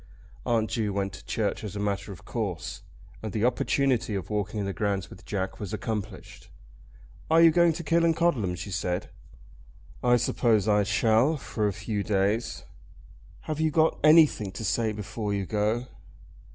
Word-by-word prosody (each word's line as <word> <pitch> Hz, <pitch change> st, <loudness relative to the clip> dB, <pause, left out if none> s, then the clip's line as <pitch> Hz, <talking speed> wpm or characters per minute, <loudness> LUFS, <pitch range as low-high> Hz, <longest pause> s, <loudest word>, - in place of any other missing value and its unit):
Aunt 110 Hz, -2 st, +1 dB
Ju 110 Hz, -3 st, -1 dB
went 100 Hz, -1 st, -2 dB
to 95 Hz, -, -11 dB
church 110 Hz, -1 st, -2 dB
as 105 Hz, -2 st, -6 dB
a -, -, -3 dB
matter 100 Hz, -2 st, -2 dB
of -, -, -11 dB
course, -, -, -4 dB, 0.4 s
and 110 Hz, -, -5 dB
the 110 Hz, +1 st, +1 dB
opportunity 125 Hz, -2 st, +1 dB
of 95 Hz, +2 st, -5 dB
walking 105 Hz, 0 st, -2 dB
in 100 Hz, -, -2 dB
the 100 Hz, -, -3 dB
grounds 100 Hz, -2 st, -2 dB
with 90 Hz, -, -13 dB
Jack 95 Hz, -2 st, -3 dB
was 105 Hz, -2 st, -5 dB
accomplished. 105 Hz, -2 st, -6 dB, 0.8 s
"Are 160 Hz, +1 st, +5 dB
you 165 Hz, -1 st, +8 dB
going 170 Hz, +1 st, +4 dB
to 170 Hz, -, -6 dB
Killancodlem?" 165 Hz, -, +2 dB
she 95 Hz, +3 st, -6 dB
said. 90 Hz, -1 st, -2 dB, 0.9 s
"I 120 Hz, 0 st, +5 dB
suppose 110 Hz, -3 st, +1 dB
I 105 Hz, -1 st, +4 dB
shall, 115 Hz, +8 st, +3 dB
for 110 Hz, -6 st, -2 dB
a -, -, 0 dB
few 110 Hz, 0 st, -3 dB
days." 105 Hz, +3 st, 0 dB, 0.8 s
"Have 155 Hz, -1 st, -4 dB
you 160 Hz, -, +3 dB
got 160 Hz, +1 st, +2 dB
anything 155 Hz, -, +5 dB
to 110 Hz, -, -5 dB
say 110 Hz, +2 st, +1 dB
before 105 Hz, 0 st, -4 dB
you 100 Hz, -1 st, -2 dB
go?" 110 Hz, +4 st, 0 dB
110 Hz, 165 wpm, -27 LUFS, 100-125 Hz, 0.9 s, you